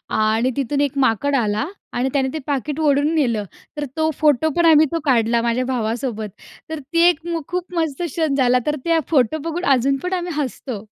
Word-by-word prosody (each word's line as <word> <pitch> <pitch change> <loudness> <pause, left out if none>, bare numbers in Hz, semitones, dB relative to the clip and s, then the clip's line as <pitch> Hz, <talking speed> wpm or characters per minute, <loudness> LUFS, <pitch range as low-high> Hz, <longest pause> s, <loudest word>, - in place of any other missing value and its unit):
आणि 220 +3 +1
तिथून 280 +1 -1
एक 285 -1 0
माकड 265 +5 +1
आला 215 +1 0 0.3
आणि 250 +2 0
त्याने 270 -2 +1
ते 315 - -3
पाकीट 290 +1 -2
ओढून 295 +1 +2
नेलं, 235 -9 +1 0.3
तर 295 - -2
तो 315 0 +1
फोटो 305 0 +3
पण 340 - +3
आम्ही 315 -1 +6
तो 330 - +1
काढला 235 -4 +2
माझ्या 235 +2 0
भावासोबत. 230 -2 -2 0.4
तर 320 - -3
ती 335 - +2
एक 330 -3 +1
मु 335 -1 -2
खूप 360 0 -4
मस्त 320 -2 -1
क्षण 320 -3 -1
झाला. 255 -2 +3
तर 300 0 0
त्या 330 -1 +2
फोटो 275 0 +2
बघून 350 +3 -3
अजून 270 +2 +1
पण 360 +1 -3
आम्ही 355 -1 -2
हसतो. 250 -5 -6
280 Hz, 195 wpm, -20 LUFS, 245-315 Hz, 0.4 s, आम्ही